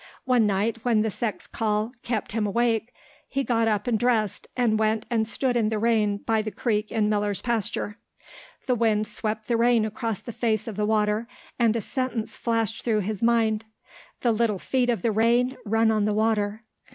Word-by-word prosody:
One 250 -4 +3
night 210 +3 0
when 225 -3 +3
the 220 - -1
sex 215 +2 -3
call 215 0 -1
kept 230 -4 -3
him 215 -1 0
awake 230 +1 0 0.4
he 275 -1 -1
got 230 -3 +1
up 210 -2 0
and 230 -3 +1
dressed, 225 -4 +1
and 225 -3 +2
went 220 0 +1
and 220 -2 +1
stood 250 +2 0
in 225 -3 +2
the 220 - -1
rain 215 -2 +2
by 220 +1 0
the 215 - -4
creek 215 -1 -1
in 215 -2 +1
Miller's 205 -1 0
pasture. 225 -2 -2 0.7
The 255 - +2
wind 220 -3 +2
swept 215 0 -3
the 235 - +1
rain 235 -1 +3
across 220 -1 -3
the 235 - -8
face 225 -1 0
of 220 - -5
the 210 +1 0
water 215 +1 +1 0.3
and 230 -2 +3
a 230 - 0
sentence 250 -1 -3
flashed 225 -2 -1
through 220 -3 +1
his 205 +1 -4
mind: 225 -2 +2 0.6
"The 240 - +3
little 220 -2 +1
feet 250 +5 0
of 230 -7 0
the 230 - +2
rain 235 +4 +2
run 225 +1 +3
on 215 -2 +1
the 210 - +1
water." 215 0 0
220 Hz, 195 wpm, -25 LUFS, 215-235 Hz, 0.7 s, One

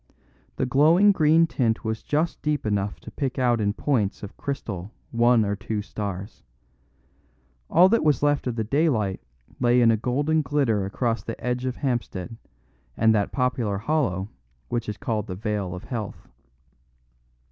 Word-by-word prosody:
The 130 - 0
glowing 160 +10 +5
green 160 -2 +4
tint 120 -9 -1
was 110 0 -2
just 155 +3 -1
deep 150 -4 -1
enough 100 -1 -1
to - - -10
pick 135 -3 -3
out 120 -3 +2
in 100 0 +1
points 110 -7 -1
of 100 - -8
crystal 105 -8 -5 0.2
one 120 -1 +4
or 100 0 -1
two 105 +1 -4
stars. 100 0 -6 1.3
All 175 +3 +6
that 230 +2 +2
was 150 -2 +2
left 145 -2 +2
of 120 - -2
the 110 - -1
daylight 110 - +1 0.4
lay 120 0 +4
in 115 -2 +5
a 110 - +2
golden 145 +7 +1
glitter 125 -8 +1
across 115 +2 -1
the 115 - -6
edge 125 +1 -2
of 130 -1 -2
Hampstead 120 - -3 0.6
and 110 0 +4
that 105 -2 +1
popular 125 -6 0
hollow 105 - 0 0.4
which 120 -2 -2
is 105 - -4
called 110 -2 -2
the 90 - -5
Vale 100 -2 -3
of 90 - -8
Health. 110 -5 -6
120 Hz, 160 wpm, -25 LUFS, 105-140 Hz, 1.3 s, All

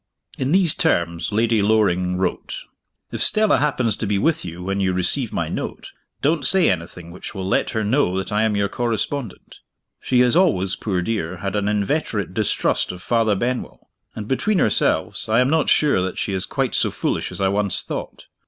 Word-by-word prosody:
In 130 +2 -1
these 180 -3 +4
terms 85 +3 0
Lady 110 0 +2
Loring 90 -4 +2
wrote: 95 - -3 0.5
"If - - -4
Stella 215 -1 +4
happens 125 -6 0
to 110 - -3
be 100 0 +1
with 160 +10 +1
you, 85 0 -7
when 95 +1 -2
you 95 -1 +1
receive 90 -1 0
my - - -2
note, - - -6 0.3
don't 150 +1 +1
say 180 +6 +4
anything 85 -1 -6
which 90 +4 -9
will 95 -1 -4
let - - +1
her 110 - 0
know 105 -4 +1
that 95 +2 -4
I 105 +1 +1
am 110 -1 +1
your 100 0 +1
correspondent. 120 +2 -4 0.4
She 125 -1 +2
has 125 +2 +3
always, 120 - +2
poor 95 -4 -2
dear, 95 -5 -3
had 100 +2 -4
an 105 0 0
inveterate 105 - -1
distrust 105 0 0
of 90 0 -10
Father 115 -3 +1
Benwell; 125 +5 -4 0.2
and, 105 -1 -6
between 180 - 0
ourselves, 110 - +1
I 110 +2 +3
am 125 +2 +2
not 160 -1 +2
sure 145 -11 +3
that 95 0 -3
she 100 - -2
is 95 -1 -2
quite - - -2
so - - +1
foolish - - -2
as - - -7
I 95 -1 +2
once 100 0 0
thought. - - -7
105 Hz, 195 wpm, -21 LUFS, 95-125 Hz, 0.5 s, these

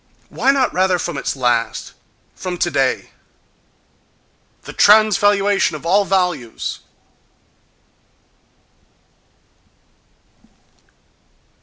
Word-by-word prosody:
—Why - - -1
not 270 -2 +2
rather 185 0 +1
from 175 -2 -4
its 135 - -3
last?—From 125 - -4
today?—The 140 -7 -7
transvaluation 205 -3 +3
of 155 - -10
all 200 +4 +2
values!... 180 -12 -2
180 Hz, 55 wpm, -18 LUFS, 140-205 Hz, -, transvaluation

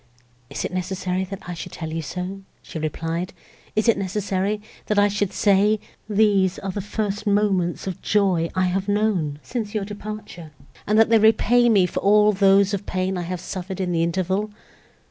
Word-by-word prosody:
"Is - - -4
it - - -4
necessary 185 0 -2
that 195 0 -9
I 180 - -4
should 165 - -8
tell 160 -2 -5
you 165 - -2
so?" 180 +4 -5 0.2
she 160 - -7
replied, 165 +3 -3 0.4
"is 215 +2 +1
it 230 -4 +4
necessary, 195 +1 -1 0.3
that 210 - 0
I 205 0 +6
should 205 -1 -1
say—these 205 -1 +2
are 195 - -4
the 200 - -4
first 210 +1 -3
moments 200 -4 +1
of 190 -3 -5
joy 185 -5 +2
I 185 0 +2
have 190 +2 -1
known, 205 -8 0
since 225 -4 -4
your 205 -2 -1
departure, 205 -6 -8 0.3
and 210 +2 +3
that 225 0 +5
they 225 -1 +5
repay 230 +3 +4
me 200 -5 +5
for - - -3
all 210 +1 +5
those 195 0 +4
of 200 0 -3
pain 185 +1 -1
I 180 - -2
have 180 -1 -3
suffered 185 +1 -6
in 185 -2 -1
the 165 -1 +1
interval?" 185 +5 0
195 Hz, 185 wpm, -23 LUFS, 180-210 Hz, 0.4 s, I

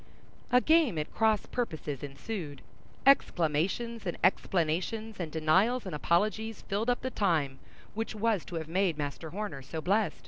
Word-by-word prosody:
A 250 +1 +6
game 315 - +4
at 150 - -3
cross 220 -2 +2
purposes 155 - -3
ensued; 145 +1 -6 0.4
exclamations 200 - +2
and 175 - -2
explanations, 190 +5 0
and 165 -4 -3
denials 185 +11 +2
and 185 - -5
apologies 215 +8 0
filled 215 +4 -1
up 245 - +1
the 260 - -3
time 155 - +1 0.3
which 225 +1 -3
was 215 -3 +1
to 175 - -7
have 160 -1 -3
made 180 -1 +1
Master 145 +2 -4
Horner 180 -6 -5
so 150 +5 -6
blest. 190 -1 +1
185 Hz, 150 wpm, -30 LUFS, 155-220 Hz, 0.4 s, A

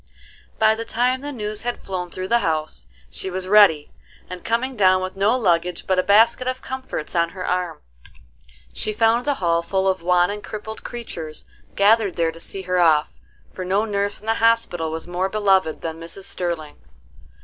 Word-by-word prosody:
By 220 0 +4
the 225 +1 -4
time 250 +3 0
the 290 +1 -5
news 210 -4 -4
had 245 0 -4
flown 180 -2 -4
through 185 +2 -6
the 235 - +4
house, 155 - -2 0.2
she 190 - -5
was 185 0 -4
ready; 195 -7 +5 0.4
and, 180 -1 -8
coming 255 +3 -1
down 185 -3 +4
with 185 0 -5
no 205 +6 +2
luggage 175 -5 0
but 185 -1 +1
a - - +5
basket 225 +6 +4
of 255 0 -3
comforts 260 -12 -5
on 170 -1 +2
her 180 - -4
arm, 180 -2 -2 0.9
she 215 - -3
found 225 +2 +2
the 290 -1 +1
hall 170 -4 +1
full 190 +2 -1
of 190 -1 +1
wan 180 +1 +3
and 210 0 -6
crippled 220 +1 -7
creatures 165 -10 -7 0.3
gathered 205 -1 +3
there 165 -1 +1
to 165 - -13
see 190 +3 -5
her 180 0 0
off, 155 -3 +3 0.4
for 185 - -5
no 195 +4 +1
nurse 200 -1 -1
in 210 - -16
the 225 - +2
hospital 230 -8 +2
was 160 +1 -5
more 180 +2 -1
beloved 195 -6 +2
than 165 0 -5
Mrs. 165 +4 -9
Sterling. 170 -5 -4
190 Hz, 190 wpm, -22 LUFS, 175-220 Hz, 0.9 s, ready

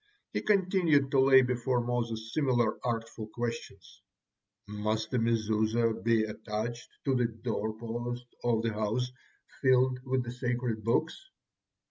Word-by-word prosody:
He - - 0
continued 180 -9 +3
to 135 - +3
lay 130 0 +7
before 125 0 0
Moses 115 -2 -2
similar 125 -7 +1
artful 115 -2 -3
questions: 105 -4 -6 0.7
"Must 110 +2 -2
a 125 - +3
Mezuzah 110 -1 +1
be 115 -1 +3
attached 110 +2 -4 0.2
to 135 - +2
the 125 -2 +2
doorpost 115 +1 -4 0.2
of 115 -2 +2
the 115 -1 0
house 110 +4 -1 0.5
filled 130 -1 +4
with 130 -1 0
the 120 - -5
sacred 120 -3 -2
Books?" 120 +8 +1
120 Hz, 125 wpm, -30 LUFS, 110-125 Hz, 0.7 s, lay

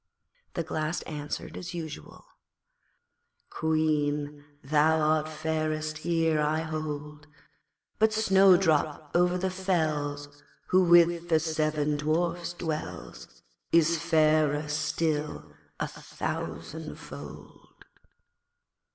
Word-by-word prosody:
the 170 - -1
Glass 155 +1 -2
answered 150 -1 -6
as 175 -1 -6
usual 155 - -8 1.3
'Queen, 150 -2 0 0.2
thou 155 +3 +3
art 155 0 +2
fairest 155 0 -2
here, 165 -1 +1
I 155 +1 +1
hold, 150 -2 -5 0.7
But 220 0 +4
Snowdrop 185 -8 +3
over 180 +1 +3
the 185 +1 -1
fells, 150 -6 -2 0.3
Who 185 0 +5
with 170 0 +5
the 160 -2 +4
seven 155 -2 0
Dwarfs 170 +3 -1
dwells, 160 -3 -6 0.3
Is 165 0 +4
fairer 155 -2 +2
still 155 0 -2 0.3
a - - -1
thousandfold.' - - -7
155 Hz, 90 wpm, -28 LUFS, 150-170 Hz, 1.3 s, Who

